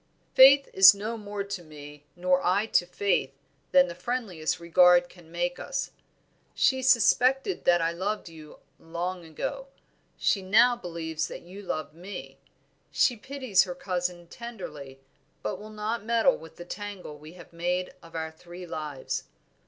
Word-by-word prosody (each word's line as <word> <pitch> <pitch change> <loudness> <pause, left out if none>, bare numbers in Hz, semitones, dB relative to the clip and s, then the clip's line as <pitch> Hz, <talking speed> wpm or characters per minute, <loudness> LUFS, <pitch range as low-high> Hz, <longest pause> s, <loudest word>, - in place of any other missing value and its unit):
"Faith 275 +1 +8
is 190 +1 +9
no 215 +3 -4
more 205 -2 -5
to 200 -2 -6
me, 150 -2 -12
nor 180 +1 +1
I 195 +4 +2
to 175 -5 +1
Faith, 180 -8 0 0.4
than 180 0 +6
the 170 - -6
friendliest 180 -5 -3
regard 175 +1 +5
can 170 -3 -17
make 175 +1 -2
us. - - -4 0.6
She 260 -1 +2
suspected 260 - +3
that 175 -1 +4
I 165 - +1
loved 195 +5 -3
you 155 -2 -12 0.2
long 175 +2 -5
ago; 165 - -5 0.5
she 195 - +1
now 220 +6 +5
believes 165 -6 -4
that - - -9
you 185 +4 -11
love 155 -6 -4
me; 180 +5 -9 0.5
she 245 - +2
pities 260 -5 +1
her 180 -1 -6
cousin 180 -1 -3
tenderly, 165 - -9 0.4
but 105 - -3
will 210 +1 -10
not 215 +1 -4
meddle 235 +4 +3
with 160 0 -13
the 175 - -10
tangle 195 -6 -7
we 155 +2 -12
have 175 -1 -15
made 180 +2 -2
of 165 0 -15
our 160 0 -3
three 175 +3 -11
lives. 150 -5 -5
180 Hz, 155 wpm, -27 LUFS, 165-210 Hz, 0.6 s, is